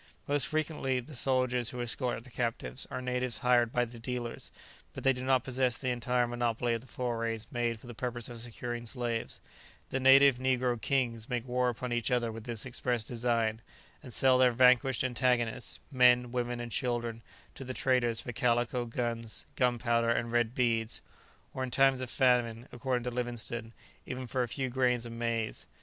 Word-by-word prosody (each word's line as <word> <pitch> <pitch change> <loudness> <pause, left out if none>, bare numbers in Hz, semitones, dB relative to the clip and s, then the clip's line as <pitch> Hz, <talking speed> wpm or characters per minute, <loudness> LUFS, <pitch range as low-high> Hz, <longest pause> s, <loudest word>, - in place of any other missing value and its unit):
Most 145 -4 +4
frequently 150 -4 -1
the 125 +5 -10
soldiers 125 -2 +2
who 125 -3 -7
escort 120 0 -2
the 125 - -15
captives 115 - -3
are 130 - -5
natives 125 -1 0
hired 120 -2 +4
by 125 0 +1
the 120 0 -11
dealers, 120 0 -5 0.4
but - - -7
they 135 - +4
do 125 0 -5
not 130 -1 +3
possess 130 -2 0
the 130 -2 -1
entire 125 0 +1
monopoly 120 0 -1
of 115 - -2
the 130 - -16
forays 115 -3 -3
made 120 -2 -1
for - - -15
the 120 - -8
purpose 120 0 -3
of 120 -1 -6
securing 120 0 -5
slaves; 120 -2 -3 0.5
the 135 - 0
native 135 0 +7
negro 125 -2 +1
kings 120 -4 0
make 125 0 -2
war 125 0 +1
upon 120 +1 -4
each 120 +1 0
other 120 -2 +1
with 110 0 -9
this 115 -2 -1
express 125 -2 -1
design, 115 -1 0 0.4
and 130 - -10
sell 130 +3 +4
their 125 -1 +6
vanquished 125 +1 +4
antagonists, 120 -4 0
men, 125 -2 +5
women, 120 -1 -2
and 120 0 -6
children, 120 -3 -2 0.3
to - - -8
the 130 - -5
traders 120 -3 +1
for 125 - -5
calico, 120 -1 +1
guns, 115 -1 -3
gunpowder 120 -2 +2
and 115 0 0
red 120 0 +1
beads; 115 -3 0 0.5
or 130 - -3
in 130 - -3
times 135 0 +3
of 130 - -4
famine, 120 -3 +2
according 125 0 -2
to 125 - -3
Livingstone, 120 -1 -4 0.4
even 130 0 -4
for 125 +2 -1
a 120 - 0
few 130 +3 -2
grains 125 -1 +1
of 115 - -7
maize. 115 -1 -2
120 Hz, 185 wpm, -31 LUFS, 115-125 Hz, 0.5 s, native